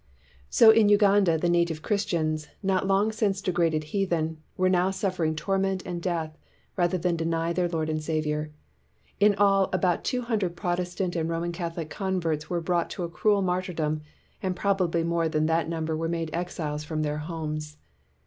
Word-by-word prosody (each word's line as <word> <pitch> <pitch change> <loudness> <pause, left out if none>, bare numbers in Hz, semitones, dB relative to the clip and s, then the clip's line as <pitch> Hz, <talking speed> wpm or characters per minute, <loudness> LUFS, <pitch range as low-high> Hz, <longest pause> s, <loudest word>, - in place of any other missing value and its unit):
So 225 -1 +8
in 220 -2 +5
Uganda 200 -4 +4
the 175 - 0
native 170 -2 +1
Christians, 160 -7 -1 0.2
not 190 0 +1
long 200 +3 +3
since 210 -3 0
degraded 170 -5 +1
heathen, 165 -5 0 0.2
were 185 - +3
now 185 0 +3
suf 190 -1 -2
fering 155 -2 0
torment 195 +1 0
and 175 -2 -4
death 165 -3 -2 0.4
rather 175 0 +1
than 175 0 0
deny 165 0 -1
their 175 0 0
Lord 160 -2 -1
and 155 0 -1
Saviour. 155 -1 -1 0.7
In 205 0 +5
all, 195 -1 +3
about 185 -2 +1
two 250 -1 -1
hundred 210 -7 -1
Protestant 180 0 -2
and 165 -1 -1
Roman 165 +1 -2
Catholic 170 -2 -5
converts 175 -6 -2
were 175 -2 -1
brought 170 0 0
to 185 - -5
a 170 - -3
cruel 200 +3 +2
martyr 185 0 -1
dom, 155 -1 -1 0.4
and 185 -3 -1
probably 180 -4 +1
more 170 -1 0
than 155 -1 +1
that 165 +1 +1
number 160 -1 -2
were 165 +1 -2
made 165 -2 -2
exiles 160 -4 -3
from 155 0 -2
their 150 0 -2
homes. 155 -1 -5
170 Hz, 175 wpm, -27 LUFS, 160-190 Hz, 0.7 s, So